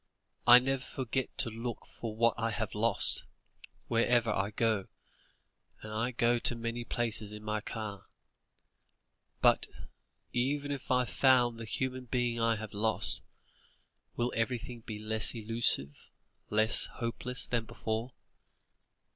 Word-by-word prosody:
I 120 0 +11
never 135 +1 0
forget 130 0 -3
to 115 - -1
look 115 +1 -5
for 110 -2 -7
what 115 +1 +3
I 115 0 -1
have 110 -1 -3
lost, 115 +2 +4 0.6
wherever 115 -1 +2
I 100 -1 0
go, 110 -2 0 1.0
and 110 0 -7
I 115 +3 0
go 120 -1 +2
to 120 - +2
many 115 +1 -4
places 110 -3 -1
in 105 0 -9
my 105 0 -2
car. 105 -2 -6 1.4
But, - - +4 0.7
even 140 +4 -1
if 140 -2 -6
I 125 0 +3
found 120 0 +3
the 115 - -6
human 130 +4 -3
being 120 -1 -1
I 115 0 +3
have 110 -1 -7
lost, 110 +2 +3 0.9
will 120 +1 -1
everything 120 +1 -2
be 110 -1 -7
less 110 +2 0
elusive, 110 -11 +1 0.4
less 110 +1 +4
hopeless 125 +1 -2
than 120 -2 -1
before?" 110 +3 -4
115 Hz, 130 wpm, -31 LUFS, 110-120 Hz, 1.4 s, I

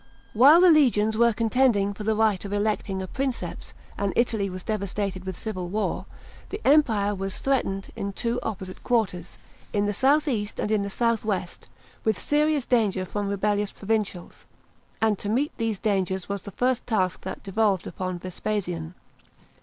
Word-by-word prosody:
§ - - -29 0.3
1. 250 +6 +7
WHILE 340 - +7
the 365 -1 +8
legions 220 -8 +4
were 235 +1 +4
contending 225 -2 +2
for 210 - -7
the 220 +1 +1
right 215 -3 +2
of 200 - -6
electing 205 -2 -1
a - - -6
Princeps, 265 +3 -4 0.2
and 200 -1 0
Italy 220 -4 +1
was 185 0 -7
devastated 200 -3 -3
with 190 -2 -5
civil 185 -5 -4
war, 210 +3 -2 0.4
the 410 - -5
Empire 225 -9 +4
vras 195 0 -4
threatened 195 -8 -1
in 200 - -3
two 235 +4 -2
opposite 185 -3 -6
quarters, 200 -8 -1 0.4
in 205 0 +1
the 205 - 0
south 285 +8 +3
east 210 -6 -2
and 210 - -1
in 215 -2 +2
the 200 -1 -4
north 230 -2 +2
west, 190 -5 -3 0.4
with 220 -3 +1
serious 295 -2 +1
danger 205 -6 +1
from 205 +2 -3
rebellious 205 0 0
provincials; 205 -4 -3 0.6
and 215 -3 +2
to 205 - -4
meet 265 +7 0
these 225 -2 -1
dangers 190 -3 -1
was 200 -1 -3
the 200 - -9
first 250 -1 +1
task 185 -6 0
that 190 - -6
devolved 200 -1 +1
upon 185 -1 -4
Vespasian. 180 -2 -4
210 Hz, 175 wpm, -25 LUFS, 195-230 Hz, 0.6 s, the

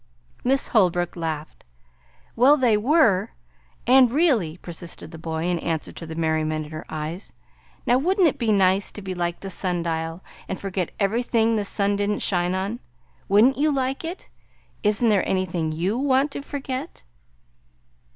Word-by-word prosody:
Miss 270 +2 +1
Holbrook 175 -5 +2
laughed. 160 -3 -5 0.7
"Well, 270 +6 +6
they 245 -5 +3
were; 220 - +3 0.5
and 255 0 +6
really" 240 - +1
persisted 170 -2 -7
the 160 - -10
boy, 160 0 -3
in 175 -1 0
answer 160 -1 -3
to 165 - -9
the 160 - -7
merriment 155 -1 -1
in 150 - -12
her 155 0 -7
eyes; 160 +5 -5 0.5
"now 245 +1 +3
wouldn't 370 +4 +3
it 295 - -1
be 230 -3 +1
nice 195 -1 +3
to 205 - -9
be 190 -1 -4
like 175 -1 -3
the 195 - -6
sundial, 170 -2 -2 0.3
and 190 - -3
forget 190 -3 -3
everything 225 +2 +1
the 210 - 0
sun 200 0 +1
didn't 205 0 0
shine 180 -1 +1
on? 200 +5 -3 0.5
Would 205 +3 +6
n't 265 +1 +2
you 305 +1 +3
like 270 0 -1
it? 340 +3 -6 0.5
Isn't 210 +2 +3
there 200 -4 +2
anything 175 -4 -1
YOU 180 +9 -1
want 275 +1 +2
to 280 - -5
forget?" 280 +1 -6
195 Hz, 160 wpm, -24 LUFS, 170-250 Hz, 0.7 s, Well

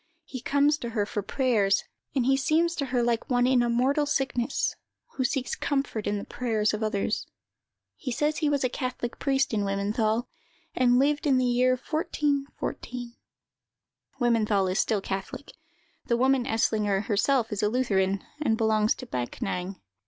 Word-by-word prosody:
He 255 -5 -7
comes 285 +3 +2
to 235 - -4
her 205 - +2
for 205 - -3
prayers, 205 -4 +1 0.3
and 255 -3 +2
he 270 +1 +4
seems 315 +5 +2
to 280 -5 -3
her 250 -1 +1
like 235 -1 0
one 245 -1 +3
in 255 -1 +4
a 240 - +1
mortal 270 +5 +2
sickness, 270 -2 0 0.4
who 260 - -1
seeks 255 +1 -1
comfort 275 -6 -2
in 205 - 0
the 200 - -5
prayers 220 -4 -1
of 215 - -3
others. 215 -1 -1 0.7
He 265 - -4
says 300 +5 0
he 305 -2 +1
was 285 -2 +1
a - - +3
catholic 250 -1 -4
priest 270 -3 +1
in 210 - +1
Wimmenthal, 215 +4 0 0.5
and 245 -1 +3
lived 290 +3 +2
in 270 -2 +4
the 255 - +2
year 250 +1 +3
1414." 280 -4 -3 1.1
(Wimmenthal 215 -6 +2
is 185 - 0
still 215 -3 +1
catholic; 195 +9 -5 0.6
the 235 - +2
woman 260 0 +3
Eslinger 210 -4 +1
herself 230 +2 +1
is 210 - -2
a 210 - +2
Lutheran, 195 -5 +1 0.2
and 225 -7 +2
belongs 220 -1 +2
to 255 - -8
Backnang.) 180 - -4
245 Hz, 165 wpm, -27 LUFS, 215-270 Hz, 1.1 s, he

